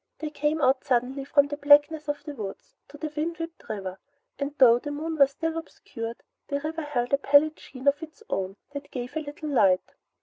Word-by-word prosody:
They 310 Hz, -1 st, -5 dB
came 300 Hz, +1 st, 0 dB
out 260 Hz, 0 st, +3 dB
suddenly 255 Hz, +2 st, 0 dB
from 285 Hz, +1 st, +4 dB
the 290 Hz, -, -4 dB
blackness 295 Hz, +1 st, +5 dB
of 290 Hz, 0 st, -3 dB
the 295 Hz, -, -6 dB
woods 275 Hz, -, -8 dB
to 295 Hz, -, -12 dB
the 305 Hz, 0 st, -5 dB
wind 330 Hz, +3 st, -2 dB
whipped 330 Hz, 0 st, -8 dB
river, 190 Hz, -3 st, -5 dB, 0.4 s
and 285 Hz, +1 st, -3 dB
though 240 Hz, -2 st, +7 dB
the 290 Hz, -, -6 dB
moon 315 Hz, +3 st, -3 dB
was 275 Hz, -2 st, +6 dB
still 325 Hz, +3 st, -3 dB
obscured, 235 Hz, -7 st, -8 dB, 0.2 s
the 280 Hz, -, -1 dB
river 315 Hz, +2 st, -4 dB
held 270 Hz, -4 st, -2 dB
a 280 Hz, -, +4 dB
pallid 290 Hz, +3 st, +4 dB
sheen 260 Hz, +1 st, -9 dB
of 285 Hz, +2 st, +4 dB
its 320 Hz, +7 st, -10 dB
own 190 Hz, 0 st, -2 dB, 0.2 s
that 285 Hz, 0 st, -7 dB
gave 250 Hz, +2 st, -6 dB
a -, -, +1 dB
little 300 Hz, +1 st, -6 dB
light. 195 Hz, -9 st, +3 dB
285 Hz, 210 wpm, -26 LUFS, 255-310 Hz, 0.4 s, though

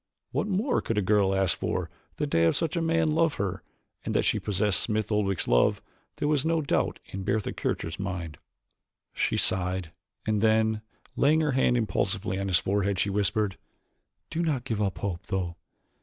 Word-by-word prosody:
What -, -, -1 dB
more 210 Hz, +7 st, +1 dB
could 115 Hz, -, -2 dB
a -, -, +3 dB
girl 95 Hz, 0 st, +3 dB
ask 95 Hz, -3 st, +3 dB
for -, -, -2 dB, 0.2 s
than 150 Hz, -1 st, -3 dB
to -, -, +3 dB
have 85 Hz, 0 st, +4 dB
such 165 Hz, -1 st, -1 dB
a 170 Hz, -, +1 dB
man 165 Hz, -1 st, +2 dB
love 160 Hz, -1 st, +2 dB
her 95 Hz, -2 st, -2 dB, 0.4 s
and -, -, -3 dB
that -, -, +3 dB
she -, -, +2 dB
possessed 100 Hz, -1 st, +1 dB
Smith 110 Hz, -1 st, -1 dB
Oldwick's 100 Hz, -3 st, +1 dB
love -, -, +3 dB, 0.4 s
there 145 Hz, -, -1 dB
was 150 Hz, -3 st, +2 dB
no 165 Hz, 0 st, +2 dB
doubt 145 Hz, -, 0 dB
in 95 Hz, 0 st, -6 dB
Bertha 105 Hz, +1 st, -1 dB
Kircher's 80 Hz, +2 st, -3 dB
mind. 90 Hz, -5 st, -4 dB, 0.7 s
She -, -, 0 dB
sighed, 90 Hz, -2 st, +1 dB, 0.3 s
and 110 Hz, -2 st, +1 dB
then, 110 Hz, 0 st, +3 dB, 0.3 s
laying 155 Hz, +3 st, +4 dB
her 150 Hz, -2 st, +1 dB
hand 130 Hz, -2 st, +3 dB
impulsively 100 Hz, -3 st, -1 dB
on 100 Hz, -, -2 dB
his 90 Hz, -2 st, +4 dB
forehead, 100 Hz, +1 st, 0 dB
she 100 Hz, +1 st, +1 dB
whispered, 105 Hz, 0 st, 0 dB, 0.7 s
"Do 165 Hz, -, -1 dB
not 150 Hz, -7 st, 0 dB
give 110 Hz, -5 st, -2 dB
up 100 Hz, -2 st, -1 dB
hope, 95 Hz, -3 st, -4 dB
though. 90 Hz, -4 st, -2 dB
105 Hz, 185 wpm, -27 LUFS, 95-135 Hz, 0.7 s, have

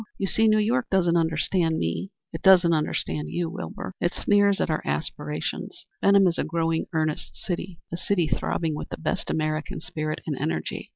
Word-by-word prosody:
You 195 Hz, -, -1 dB
see, 220 Hz, +4 st, +3 dB
New 215 Hz, 0 st, +5 dB
York 235 Hz, +4 st, +1 dB
doesn't 175 Hz, -3 st, +3 dB
understand 165 Hz, 0 st, +1 dB
me; 85 Hz, -, -2 dB, 0.2 s
it -, -, -5 dB
doesn't 180 Hz, -3 st, +6 dB
understand 150 Hz, -1 st, -1 dB
you, 170 Hz, -2 st, -2 dB
Wilbur. 190 Hz, 0 st, -6 dB
It 175 Hz, -, 0 dB
sneers 205 Hz, -1 st, +3 dB
at -, -, +1 dB
our 155 Hz, -, 0 dB
aspirations. 75 Hz, +1 st, -3 dB, 0.2 s
Benham 200 Hz, -1 st, +6 dB
is 175 Hz, -2 st, +1 dB
a -, -, +2 dB
growing, 165 Hz, 0 st, 0 dB
earnest 155 Hz, -1 st, -2 dB
city 175 Hz, -1 st, -4 dB, 0.2 s
a -, -, -1 dB
city 180 Hz, -2 st, +1 dB
throbbing 160 Hz, +1 st, -1 dB
with 150 Hz, -, -5 dB
the -, -, -5 dB
best 160 Hz, -, -2 dB
American 155 Hz, +2 st, -1 dB
spirit 155 Hz, -1 st, -4 dB
and 155 Hz, -, -2 dB
energy. 80 Hz, -9 st, -3 dB
170 Hz, 180 wpm, -25 LUFS, 155-190 Hz, 0.2 s, doesn't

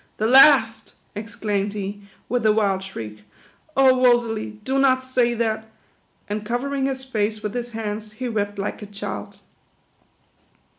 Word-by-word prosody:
" -, -, -41 dB
"The 215 Hz, -, -1 dB
last!" 230 Hz, -3 st, +5 dB, 0.2 s
exclaimed 210 Hz, -1 st, -3 dB
he, 205 Hz, 0 st, -5 dB, 0.3 s
with 245 Hz, -1 st, -1 dB
a -, -, +6 dB
wild 200 Hz, -3 st, +1 dB
shriek. 110 Hz, -, -8 dB, 0.3 s
" 310 Hz, -, -26 dB
Oh, 260 Hz, -1 st, +5 dB
Rosalie, 225 Hz, -3 st, +2 dB
do 265 Hz, +4 st, 0 dB
not 260 Hz, -1 st, +4 dB
^ay 250 Hz, -2 st, 0 dB
that!" 220 Hz, -1 st, -1 dB, 0.6 s
and 210 Hz, +1 st, -3 dB
covering 265 Hz, +5 st, -1 dB
his 265 Hz, -1 st, -3 dB
face 215 Hz, -3 st, -2 dB
with 210 Hz, -1 st, -3 dB
his 240 Hz, -1 st, -5 dB
hands, 215 Hz, -1 st, -5 dB
he 255 Hz, +3 st, -4 dB
wept 205 Hz, -3 st, -2 dB
like 200 Hz, +2 st, -4 dB
a 210 Hz, -, -7 dB
child. 105 Hz, -, -7 dB
220 Hz, 155 wpm, -23 LUFS, 205-250 Hz, 0.6 s, a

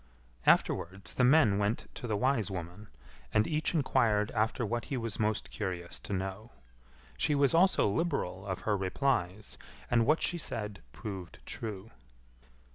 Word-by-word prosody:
Afterwards 95 Hz, +3 st, +2 dB
the 125 Hz, -, +1 dB
men 125 Hz, -7 st, +5 dB
went 105 Hz, +3 st, 0 dB
to 120 Hz, -, -6 dB
the 105 Hz, -2 st, 0 dB
wise 125 Hz, -3 st, +1 dB
woman, 90 Hz, +3 st, -6 dB, 0.4 s
and 105 Hz, -, +3 dB
each 155 Hz, +4 st, -1 dB
enquired 110 Hz, -8 st, +2 dB
after 115 Hz, +3 st, 0 dB
what 120 Hz, +1 st, -2 dB
he 135 Hz, -, -3 dB
was 115 Hz, -3 st, -3 dB
most 110 Hz, -1 st, 0 dB
curious 90 Hz, -4 st, -4 dB
to -, -, -9 dB
know. 95 Hz, +3 st, -3 dB, 0.7 s
She 150 Hz, -, +2 dB
was 140 Hz, -2 st, +4 dB
also 185 Hz, -, +5 dB
liberal 100 Hz, -, -1 dB
of 95 Hz, -1 st, -3 dB
her 105 Hz, -, +1 dB
replies, 100 Hz, -1 st, -1 dB, 0.3 s
and 115 Hz, -2 st, +4 dB
what 155 Hz, +2 st, +3 dB
she 175 Hz, -, +1 dB
said 105 Hz, -8 st, -4 dB
proved 95 Hz, -5 st, -7 dB
true. 110 Hz, -1 st, -6 dB
110 Hz, 150 wpm, -31 LUFS, 95-125 Hz, 0.7 s, men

